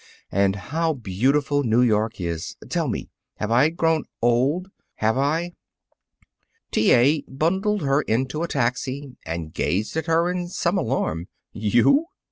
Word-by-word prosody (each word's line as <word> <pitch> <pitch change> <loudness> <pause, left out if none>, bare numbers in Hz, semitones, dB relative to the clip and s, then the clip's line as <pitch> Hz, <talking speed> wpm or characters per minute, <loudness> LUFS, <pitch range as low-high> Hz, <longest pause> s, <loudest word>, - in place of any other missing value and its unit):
And 100 0 +2
how 160 - -1
beautiful 135 +6 +1
New 120 -1 +3
York 110 -2 +1
is! 85 -2 -4
Tell - - 0
me: - - -4 0.2
Have 105 +1 -3
I 130 +6 +5
grown 165 -2 +1
old? 135 +11 +1 0.2
Have 110 +1 +1
I?" 160 +6 0 1.2
T. 110 - +3
A. 140 +5 +4
bundled 190 +7 0
her 140 +1 +2
into 130 +5 -1
a 170 - -1
taxi 130 0 -2
and 80 -1 -4
gazed 100 - -1
at 160 +1 -2
her 165 +2 +2
in 180 -1 -3
some 175 +1 0
alarm. 90 - -1 0.3
"You! 120 - +3
135 Hz, 140 wpm, -23 LUFS, 110-165 Hz, 1.2 s, I